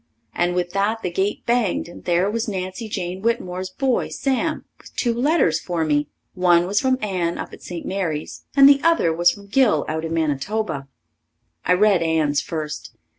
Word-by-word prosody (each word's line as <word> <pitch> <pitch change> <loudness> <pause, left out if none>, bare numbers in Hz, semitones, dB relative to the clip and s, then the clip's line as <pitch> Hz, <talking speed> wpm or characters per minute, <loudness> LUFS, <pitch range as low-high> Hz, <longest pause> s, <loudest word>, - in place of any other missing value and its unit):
And 175 0 0
with 175 -1 -1
that 205 +4 0
the 180 - -2
gate 190 +3 -1
banged 235 -8 +1
and 170 - -12
there 175 +2 +2
was 225 +3 -2
Nancy 190 +2 -4
Jane 185 -1 -4
Whitmore's 185 -5 -1
boy, 260 +6 0
Sam, 275 +3 -1
with - - -16
two 240 -2 +1
letters 245 - +2
for 170 -2 -2
me. 145 -1 +1 0.3
One 175 -2 +4
was 200 +3 +1
from 260 -1 +2
Anne 180 -4 -1
up - - -6
at - - -11
St. 175 -2 -7
Mary's 170 -6 -3
and 275 -1 +8
the 280 -1 +6
other 330 - +3
was 175 +2 +4
from 200 +2 -6
Gil 205 - +2
out 160 0 -2
in 165 - -4
Manitoba. 155 0 -1 0.8
I 180 - +4
read 200 -1 +4
Anne's 155 -3 +1
first. 150 -1 -5
185 Hz, 180 wpm, -22 LUFS, 165-220 Hz, 0.8 s, and